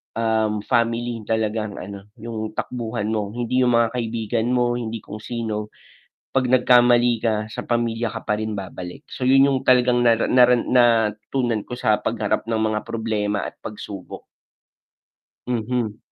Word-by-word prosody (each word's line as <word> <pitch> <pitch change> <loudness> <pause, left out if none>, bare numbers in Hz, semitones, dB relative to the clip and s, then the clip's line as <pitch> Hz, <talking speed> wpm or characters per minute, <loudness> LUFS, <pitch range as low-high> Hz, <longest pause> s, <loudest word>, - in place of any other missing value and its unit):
um, 110 -2 0
family 115 0 0
talagang 110 -2 -1
ano, 100 +1 -9
yung 110 -2 -5
takbuhan 115 -3 -3
mo, 105 -1 -2
hindi 125 +1 +1
yung 120 - +3
mga 115 -1 +3
kaibigan 115 +1 -1
mo, 120 0 +1
hindi 115 -1 -5
kung 105 +1 -8
sino, 110 -2 -4 0.6
'pag 130 -1 +2
nagkamali 120 -2 +5
ka 110 -1 +2 0.2
sa - - -5
pamilya 115 -1 0
ka - - -5
pa 105 0 0
rin 110 -1 -3
babalik. 90 -2 -7
So, 130 - -9
yun 135 +1 +6
yung 130 - +1
talagang 125 -1 +4
nara 115 0 +3
nara 125 -1 +6
natutunan 115 0 +2
ko 125 - -5
sa 110 -4 +2
pagharap - - -1
ng 115 - +1
mga 110 -1 0
problema 105 -3 -1
at - - -8
pagsubok. 105 -3 -8 1.2
Mhm. 115 -2 -2
115 Hz, 150 wpm, -22 LUFS, 110-120 Hz, 1.2 s, yun